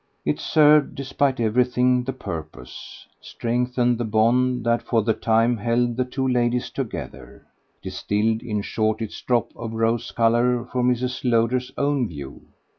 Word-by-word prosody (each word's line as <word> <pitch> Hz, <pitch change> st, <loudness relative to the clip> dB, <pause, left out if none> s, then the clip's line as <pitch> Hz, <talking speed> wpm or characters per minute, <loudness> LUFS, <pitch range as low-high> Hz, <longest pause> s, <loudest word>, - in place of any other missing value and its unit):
It -, -, 0 dB
served, 150 Hz, -1 st, +4 dB
despite 135 Hz, -1 st, -1 dB
everything, 125 Hz, +2 st, +2 dB
the 135 Hz, -, -2 dB
purpose, 80 Hz, -, -9 dB, 0.2 s
strengthened 125 Hz, 0 st, -1 dB
the -, -, 0 dB
bond 120 Hz, +3 st, +1 dB
that 115 Hz, 0 st, +2 dB
for 115 Hz, -3 st, 0 dB
the 110 Hz, +1 st, +2 dB
time 115 Hz, +2 st, +2 dB
held 120 Hz, +2 st, 0 dB
the 125 Hz, +1 st, 0 dB
two 130 Hz, +1 st, -2 dB
ladies 125 Hz, -1 st, 0 dB
together, 85 Hz, -, -7 dB, 0.4 s
distilled 110 Hz, +2 st, -1 dB
in 105 Hz, -4 st, -3 dB
short 110 Hz, 0 st, -1 dB
its 110 Hz, -, -7 dB
drop 120 Hz, -2 st, 0 dB
of 115 Hz, -1 st, -6 dB
rose 115 Hz, +1 st, 0 dB
colour 120 Hz, +1 st, +2 dB
for 125 Hz, +1 st, -3 dB
Mrs. 125 Hz, 0 st, 0 dB
Lowder's 125 Hz, +1 st, +1 dB
own 140 Hz, -3 st, +1 dB
view. 70 Hz, -6 st, -9 dB
120 Hz, 145 wpm, -23 LUFS, 115-125 Hz, 0.4 s, served